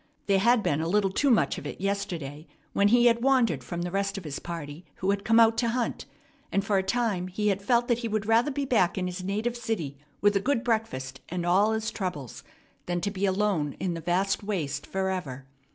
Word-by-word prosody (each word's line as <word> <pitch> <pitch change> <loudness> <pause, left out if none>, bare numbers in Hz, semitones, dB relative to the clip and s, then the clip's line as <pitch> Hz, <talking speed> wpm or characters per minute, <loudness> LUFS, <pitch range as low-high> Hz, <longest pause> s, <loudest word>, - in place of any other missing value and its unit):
There 195 -1 +3
had 235 +2 +4
been 145 +2 +1
a 165 - -1
little 195 +1 +2
too 280 +8 +2
much 220 - +2
of 145 - -7
it - - -7
yesterday, 175 -7 -3 0.3
when 200 - +4
he 240 +3 +5
wandered 240 - +2
from 175 +7 -4
the 175 - -4
rest 195 +1 -1
of 195 - -6
his 150 -3 -5
party 165 -1 -7
who 190 +1 0
had 200 0 -2
come 225 +2 +4
out 225 0 +5
to 235 - +1
hunt; 240 0 -2 0.4
and 195 0 0
for 200 -1 +2
a - - +2
time 200 -3 -1
he 210 +3 -1
had 195 0 0
felt 240 +3 +2
that 240 -1 +1
he 235 - -3
would 215 -1 -1
rather 230 +5 +3
be 280 0 -2
back 205 -10 +2
in 185 - -1
his 180 +1 -4
native 215 +5 -1
city 205 - -3 0.2
with 205 0 +3
a - - +4
good 250 0 0
breakfast 175 - -2
and 175 0 -3
all 200 +5 +3
his 220 0 -2
troubles 150 - -5 0.4
than 175 0 0
to 200 - -1
be 200 0 -1
alone 190 -7 0
in 180 -2 -3
the 165 - -5
vast 185 +4 0
waste 185 -9 -3
forever. 185 -9 -3
195 Hz, 225 wpm, -27 LUFS, 175-225 Hz, 0.4 s, he